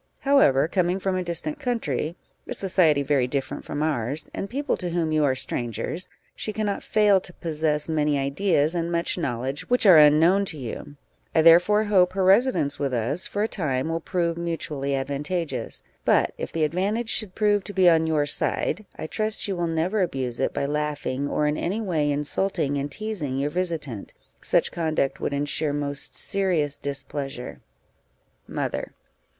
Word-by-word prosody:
However, 215 - +4
coming 180 +1 +1
from 190 -1 -1
a 185 - 0
distant 290 - -3
country, 175 - -2 0.3
a - - -2
society 170 -7 +3
very 135 -3 +1
different 135 0 -4
from 145 +1 -3
ours, 145 -1 -1
and 195 - -4
people 280 +3 -1
to 180 - -3
whom 165 -2 -1
you 155 -1 +2
are 135 -2 +2
strangers, 130 +7 -3 0.3
she 215 - -3
cannot 210 -1 -2
fail 205 -3 +3
to 180 - -7
possess 155 -3 -1
many 150 -2 +1
ideas 145 +3 +1
and 170 -1 -2
much 170 0 0
knowledge 135 -3 -3
which 250 -2 +2
are 180 -6 +9
unknown 160 +6 +5
to 160 - -5
you; 135 +2 -7 0.4
I 160 - +5
therefore 175 +6 +6
hope 185 -4 +3
her 190 0 0
residence 190 - +3
with 140 -3 -1
us 135 +10 -1
for 205 - -2
a - - +1
time 150 -8 -1
will 165 0 -1
prove 170 -1 -1
mutually 150 -5 -2
advantageous; 140 0 -3 0.2
but - - +3
if - - -6
the 160 - 0
advantage 200 +9 -1
should 210 -5 0
prove 205 -2 +2
to - - -6
be 185 -2 +4
on 160 -1 +5
your 155 -2 +2
side, 200 +7 -1
I - - -6
trust 215 +6 -2
you 195 - -2
will 175 -1 -1
never 165 +6 0
abuse 130 -9 -2
it - - +1
by - - -2
laughing, 145 -2 -2
or 150 - 0
in 150 +1 0
any 195 +6 -2
way 160 -9 0
insulting 150 +1 0
and 140 +1 -3
teazing 175 -9 -3
your 145 +2 -1
visitant; 160 - -3 0.3
such - - +2
conduct 155 -5 -1
would - - -1
ensure 145 +1 -1
most 145 -1 -3
serious 175 -8 0
displeasure. 140 -2 -5 0.9
_Mother. - - -3
160 Hz, 175 wpm, -25 LUFS, 145-190 Hz, 0.9 s, are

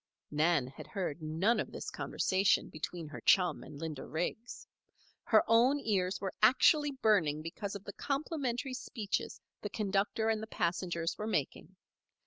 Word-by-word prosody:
Nan 150 -2 +2
had 130 - -10
heard 175 -6 -3
none 165 +9 +1
of - - -3
this - - -6
conversation 190 +1 +1
between 160 +1 -5
her 150 - -8
chum 180 -2 +4
and 150 - -10
Linda 155 -2 -5
Riggs. 175 - -4 0.6
Her 215 -2 +5
own 245 +5 +5
ears 195 -6 0
were 195 -2 -3
actually 295 +6 +5
burning 160 -9 +3
because 195 +5 -5
of 200 - -7
the 200 - -8
complimentary 275 -3 -2
speeches 225 -5 -3 0.2
the 205 - -4
conductor 205 +2 0
and 220 -1 +1
the 220 - -6
passengers 170 -3 -1
were 215 - -3
making. 165 0 -2
195 Hz, 150 wpm, -33 LUFS, 165-225 Hz, 0.6 s, Her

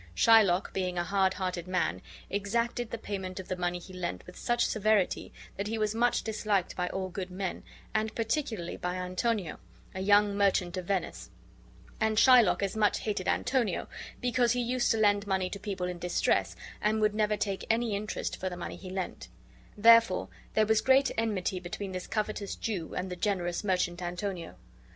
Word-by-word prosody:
Shylock, 205 - +5
being 180 -2 -2
a 175 - +1
hard 190 +1 +1
hearted 180 -2 -3
man, 180 - 0 0.3
exacted 230 +4 -1
the 230 - -4
payment 190 -3 -5
of 185 - -8
the 185 - -1
money 180 0 -1
he 180 +2 -11
lent 180 -1 -4
with 180 - -12
such 240 0 +1
severity 215 -3 +1 0.3
that 200 +1 -2
he 225 +1 -2
was 215 -1 0
much 240 +2 +2
disliked 210 -4 -1
by 180 0 -1
all 190 -1 -3
good 185 0 -5
men, 185 0 -4 0.3
and 220 0 -1
particularly 225 - -2
by 180 0 -3
Antonio, 185 0 -2 0.3
a 190 - -5
young 205 +1 +4
merchant 195 -3 +2
of 185 -1 -4
Venice; 185 -3 -2 0.7
and 220 0 +1
Shylock 220 -8 +6
as 195 - -1
much 215 -1 +2
hated 200 -4 -2
Antonio, 245 -8 0 0.3
because 245 -1 +2
he 245 - -1
used 245 +1 +1
to 225 - +3
lend 205 -1 +3
money 190 -2 0
to 200 - -5
people 195 -3 -3
in 180 -1 -5
distress, 180 0 +1 0.3
and 215 +1 +2
would 215 -1 +2
never 210 0 +1
take 195 -1 -2
any 225 -1 +1
interest 210 +1 -3
for 185 - -2
the 180 - -7
money 175 - -6
he 185 - -9
lent; 190 0 -5 0.5
therefore 230 +2 +6 0.3
there 215 - +4
was 220 0 +3
great 265 0 +4
enmity 205 -5 -1
between 190 +2 -6
this 185 -1 -5
covetous 215 -2 -2
Jew 190 -8 -4
and 185 0 -3
the - - -3
generous 180 -2 -1
merchant 180 -3 0
Antonio. 175 - -4
200 Hz, 185 wpm, -30 LUFS, 180-220 Hz, 0.7 s, Shylock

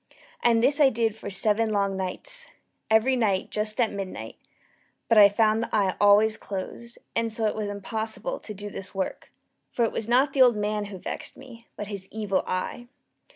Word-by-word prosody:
And 230 -1 +3
this 285 +4 +3
I 275 - +7
did 225 -3 0
for 220 - -8
seven 215 +3 +2
long 200 -2 0
nights 190 - -5 0.4
every 220 +4 +4
night 205 -6 0
just 215 +2 -2
at 235 -3 +2
midnight 185 - -6 0.7
but 225 -2 +5
I 200 -1 +9
found 215 +2 +2
the 230 - -3
eye 200 -4 +1
always 210 +2 +5
closed; 220 +5 -7 0.2
and 230 0 0
so 220 0 -1
it 215 - +1
was 215 -1 -3
impossible 220 - -4
to 215 - -8
do 205 +1 -7
the 190 0 -7
work; 190 - -4 0.4
for 235 - +1
it - - -1
was 225 - -3
not 265 +3 +3
the 270 - +2
old 245 -3 +7
man 210 0 -1
who 200 -1 -8
vexed - - -7
me, 245 -3 -13
but 210 - -5
his 200 -2 -7
Evil 210 -3 -1
Eye. 185 +6 -3
215 Hz, 195 wpm, -26 LUFS, 200-230 Hz, 0.7 s, I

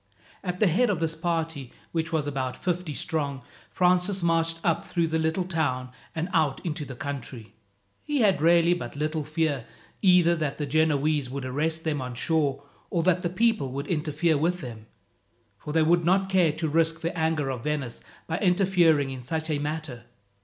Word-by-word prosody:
At 180 -1 -3
the 215 - +5
head 215 +8 +3
of 195 -6 0
this 165 -1 0
party, 160 -5 -2 0.2
which 165 0 -2
was 155 -3 0
about 135 -3 -3
fifty 175 -4 -2
strong, 140 -5 -3 0.3
Francis 180 +1 +2
marched 165 -1 +1
up 165 - +1
through 170 -2 0
the 160 0 0
little 160 +3 0
town 145 -8 -1 0.2
and 165 +2 -1
out 155 -5 +2
into 160 -2 -2
the 130 - -8
country. 125 -4 -6 0.5
He 290 -3 0
had 195 -8 +3
really 170 +1 +5
but 175 - -5
little 155 +1 -1
fear, 155 -3 -1 0.4
either 180 -3 +5
that 150 -3 -2
the 150 - -2
Genoese 150 -2 +1
would 135 0 -5
arrest 160 +5 -1
them 150 -3 -1
on 125 -1 -5
shore, 140 0 0 0.3
or 170 -2 0
that 180 0 +3
the 175 - -1
people 185 - +1
would 140 +2 -3
interfere 155 0 0
with 175 +3 0
them, 115 -5 -8 0.7
for 150 - -6
they 160 +1 +3
would 170 +2 +3
not 190 +3 +2
care 180 -4 +4
to 160 +2 -3
risk 165 +1 +1
the 165 +1 -2
anger 160 -4 0
of 125 -3 -6
Venice 145 -6 -2 0.2
by 160 - -2
interfering 180 -7 +3
in 130 -1 -6
such 160 +5 -3
a 145 - 0
matter. 145 -5 -4
160 Hz, 185 wpm, -26 LUFS, 145-170 Hz, 0.7 s, the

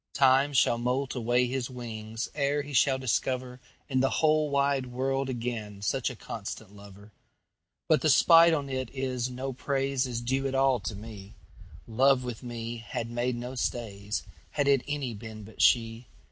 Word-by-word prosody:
Time 135 +1 +4
shall 120 -4 +3
moult 130 +3 -1
away 125 0 +2
his 125 0 -2
wingsEre 120 +4 -3
he 145 - -8
shall 135 +1 +4
discoverIn 130 0 -1 0.4
the 135 +1 +3
whole 155 -1 +2
wide 140 -2 +1
world 135 +2 -1
againSuch 115 -1 -2
a 125 - -7
constant 105 -2 -7
lover. 100 +1 -14 0.8
But - - +4
the - - +2
spite 165 0 +7
on 145 -3 0
't 130 -2 -3
is, 130 -2 -2
no 130 +2 -4
praiseIs 135 -2 -1
due 135 +2 0
at 135 - -3
all 135 -2 +3
to 105 +1 -5
me:Love 105 - -2
with 120 -3 -6
me 120 -1 -5
had 115 +1 -5
made 120 +1 -1
no 125 +2 -6
stays, 105 -5 -3 0.3
Had 145 -2 -1
it 140 -2 +4
any 145 -5 -2
been 110 0 -9
but 110 +2 -8
she. 115 0 +3
125 Hz, 155 wpm, -28 LUFS, 115-135 Hz, 0.8 s, spite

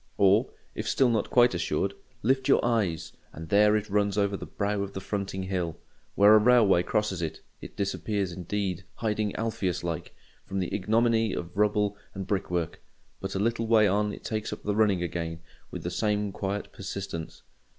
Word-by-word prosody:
Or, 100 +5 +4 0.2
if - - -3
still 130 -2 +3
not 110 -3 0
quite 120 -2 +5
assured, 85 +2 -1 0.3
lift 130 +3 +2
you 140 - +6
your - - 0
eyes, 105 -9 0 0.2
and 80 +1 -9
there 105 +1 +5
it 105 0 -1
runs 100 -1 +1
over 100 -1 +2
the - - -7
brow 100 0 -1
of 100 0 -4
the - - -4
fronting 95 -1 -3
hill. 90 -4 -2 0.4
Where 105 +2 +7
a 110 - +8
railway 110 -5 +5
crosses 100 -1 -1
it, 80 -2 -4 0.2
it - - -10
disappears 100 -1 -1
indeed—hiding 100 +3 -3
Alpheus 95 -6 -2
like, 85 -2 -4 0.3
from 95 - -5
the 90 -2 -2
ignominy 110 +1 +2
of 85 0 -5
rubble 105 0 +2 0.2
and 95 0 -4
brick 100 -1 -1
work; 85 -2 -2 0.4
but 95 0 -5
a - - 0
little 115 +2 0
way 110 -2 +5
on 105 +2 +1
it - - -9
takes 110 -1 -3
up - - -7
the 105 0 -1
running 105 -5 +3
again 85 -1 -3 0.3
with - - -7
the - - -3
same 105 -1 0
quiet 100 +1 -4
persistence. 95 -4 -6
100 Hz, 185 wpm, -28 LUFS, 95-105 Hz, 0.4 s, a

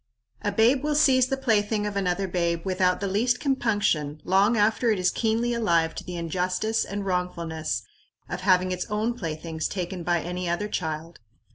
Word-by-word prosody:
A 205 - -1
babe 240 +6 +3
will 300 0 0
seize 260 -4 +5
the 270 - -1
plaything 215 -4 +1
of 205 -1 -3
another 195 0 0
babe 170 -1 -1
without 185 -1 +1
the 200 - -1
least 240 +6 +1
compunction 205 - 0
long 200 +5 +3
after 220 +3 +2
it 215 - +2
is 180 0 +2
keenly 230 +1 0
alive 170 -8 +2
to - - -7
the 180 - -7
injustice 180 +6 -1
and 200 0 -5
wrongfulness 165 - -2 0.4
of 175 +1 -5
having 185 -1 +3
its 180 0 -3
own 215 +3 0
playthings 160 -5 -4
taken 185 -1 -4
by 175 0 +1
any 180 0 -4
other 175 +5 -1
child. 160 -4 -4
190 Hz, 175 wpm, -26 LUFS, 175-220 Hz, 0.4 s, seize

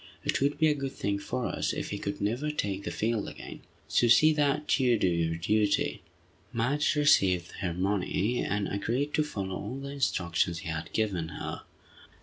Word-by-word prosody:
It - - 0
would 140 +1 +1
be 160 - +4
a 150 - +4
good 135 -2 -4
thing 100 -4 -1
for 125 +4 -3
us - - -1
if - - -4
he 100 - -3
could 100 - -4
never 120 +9 0
take 100 -9 -2
the - - -1
field 110 -1 -1
again. - - -9 0.3
So 120 - +3
see 155 +7 +6
that 150 0 +1
you 125 -3 +4
do 95 - +2
your 85 -2 +1
duty!" 105 +4 +1 0.5
Madge 130 +7 +1
received 95 - +3
her 90 - -1
money, 100 +4 0
and 105 0 -1
agreed 120 +9 -1
to 155 - +3
follow 100 -10 -4
all 130 - -5
the 140 0 -6
instructions 85 -11 0
he 85 - -6
had 80 0 -4
given 95 -7 -1
her. 80 - -6
105 Hz, 185 wpm, -29 LUFS, 95-140 Hz, 0.5 s, see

